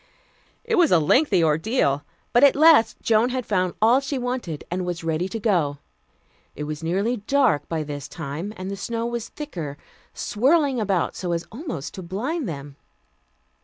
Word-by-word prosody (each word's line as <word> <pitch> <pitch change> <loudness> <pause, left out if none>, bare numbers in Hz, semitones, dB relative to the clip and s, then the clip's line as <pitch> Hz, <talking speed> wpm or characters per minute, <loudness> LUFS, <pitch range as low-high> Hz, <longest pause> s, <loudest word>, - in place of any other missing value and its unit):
It 455 -4 +1
was 335 -4 +4
a - - +7
lengthy 190 - +3
ordeal, 155 - +1 0.3
but 240 - +5
at 280 - +7
last 300 -6 +6
Joan 225 +2 +3
had 255 -2 -3
found 185 -3 0
all 230 +4 +5
she 275 0 -3
wanted 245 - -3
and 180 +1 -1
was 175 -1 -4
ready 165 +3 -1
to 225 - -4
go. 175 -10 +1 0.8
It 150 - -5
was 150 +1 -5
nearly 195 +9 0
dark 230 - +1
by 160 -2 -1
this 145 -2 -6
time, 160 +5 -5
and 185 +1 -5
the - - -3
snow 230 +3 -3
was 235 -1 -4
thicker, 170 - -6 0.3
swirling 275 +3 +1
about 195 -5 0
so 175 -2 -2
as 170 0 -2
almost 235 - -6
to 190 - -7
blind 230 - -3
them. 140 -2 -7
200 Hz, 170 wpm, -23 LUFS, 165-250 Hz, 0.8 s, a